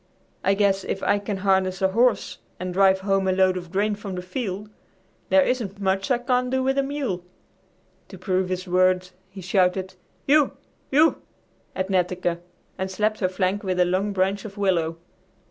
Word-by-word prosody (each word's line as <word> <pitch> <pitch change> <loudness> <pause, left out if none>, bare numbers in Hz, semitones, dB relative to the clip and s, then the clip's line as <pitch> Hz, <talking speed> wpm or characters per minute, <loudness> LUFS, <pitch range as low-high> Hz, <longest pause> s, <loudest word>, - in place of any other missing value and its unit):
I 195 +1 +3
guess 195 -1 +2
if 190 - -4
I 205 - +2
can 200 0 -4
harness 190 -1 +2
a 190 - +2
horse 235 +4 +1 0.2
and 180 0 -4
drive 190 0 +4
home 195 -1 +1
a - - +3
load 185 0 +3
of 175 -2 -6
grain 205 +2 +1
from 205 -2 -6
the 180 - -5
field, 200 0 -4 0.6
there 285 -1 +5
isn't 225 -7 -2
much 195 0 0
I 250 - +3
can't 250 +1 0
do 260 0 0
with 270 +1 +1
a - - +4
mule!" 270 -10 -3 0.8
To - - -11
prove 185 -2 -1
his 185 0 -3
words 185 0 +2 0.2
he 190 0 -10
shouted 185 0 +1 0.3
"U 290 +1 +4 0.4
U" 310 +4 +3 0.5
at 190 +1 -2
Netteke 180 -2 0 0.4
and 190 0 -2
slapped 215 +3 -1
her 185 - +1
flank 185 +2 -1
with 185 -2 -2
a 180 - +5
long 190 +3 0
branch 195 +1 0
of 205 -1 -9
willow. 170 -5 0
190 Hz, 180 wpm, -24 LUFS, 185-210 Hz, 0.8 s, there